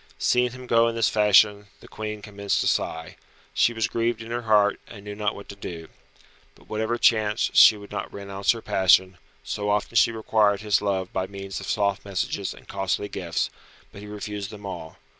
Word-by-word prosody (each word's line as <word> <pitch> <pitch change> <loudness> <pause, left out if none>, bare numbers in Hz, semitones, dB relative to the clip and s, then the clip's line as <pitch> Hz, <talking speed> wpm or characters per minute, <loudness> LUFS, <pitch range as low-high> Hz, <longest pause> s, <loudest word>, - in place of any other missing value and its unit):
Seeing 125 0 +2
him 130 +1 -10
go 115 -1 +4
in 115 - -2
this 115 -1 +2
fashion 105 -1 +4
the - - -15
Queen 105 -1 -6
commenced 100 -1 -2
to - - 0
sigh. 80 0 -2 0.4
She 90 - +3
was 115 -1 -1
grieved 115 -1 -1
in 115 - -9
her 120 +1 -2
heart, 105 -3 +3
and 100 -3 -12
knew 105 - -6
not 105 0 -2
what 100 - -10
to 100 - -8
do. 85 -4 -8 0.7
But - - -22
whatever 110 +2 -2
chanced 110 -2 +2
she 110 - +8
would 100 -1 -12
not - - -5
renounce 100 0 -5
her 115 - -9
passion, 95 -1 +3 0.2
so 105 0 -3
often 105 +3 -1
she 115 - +5
required 105 -2 +1
his 105 -2 +1
love 95 -2 -2
by 95 0 -1
means 100 0 -7
of 100 - -7
soft 100 -2 0
messages 100 0 -3
and - - -13
costly 100 +1 -2
gifts, 85 -4 -2 0.4
but 100 - -11
he 105 - -10
refused 105 -1 -6
them 105 -1 -10
all. 85 -4 -7
105 Hz, 200 wpm, -25 LUFS, 100-110 Hz, 0.7 s, she